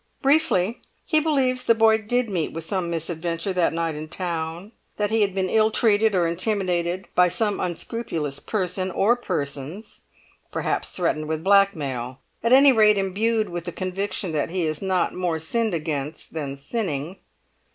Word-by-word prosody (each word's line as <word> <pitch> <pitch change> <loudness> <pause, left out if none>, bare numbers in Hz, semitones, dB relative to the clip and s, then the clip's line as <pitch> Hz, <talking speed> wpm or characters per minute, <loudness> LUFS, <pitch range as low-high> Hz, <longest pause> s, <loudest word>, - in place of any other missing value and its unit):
Briefly, 250 - +2 0.2
he 310 - +3
believes 265 -5 +1
the 230 - +4
boy 220 0 +4
did 245 +3 0
meet 180 -6 -2
with 165 - -4
some 185 0 -2
misadventure 165 +2 -2
that 180 -2 +2
night 165 -1 -1
in 155 +1 -6
town; 170 +2 -4 0.3
that 210 0 0
he 225 0 +2
had 195 -2 +1
been 190 -1 0
ill 220 +2 +3
treated 220 -1 +3
or 175 -2 +3
intimidated 180 0 -1
by 180 0 +5
some 205 +3 0
unscrupulous 165 -5 -3
person 185 -2 -2
or 205 +6 +3
persons; 165 - -5 0.5
perhaps - - -2
threatened 155 -4 -1
with 160 0 -3
blackmail; 145 -11 +2 0.2
at 230 - 0
any 275 +2 +8
rate 215 -3 +5
imbued 215 +3 0
with 175 -1 -5
the 175 - -4
conviction 190 +1 -3
that 150 -2 -1
he 180 0 -1
is 155 -1 -2
not 190 -2 0
more 175 -3 -1
sinned 215 +5 -1
against 155 -1 -4
than 145 -4 -4
sinning. 160 - -4
185 Hz, 160 wpm, -24 LUFS, 165-215 Hz, 0.5 s, any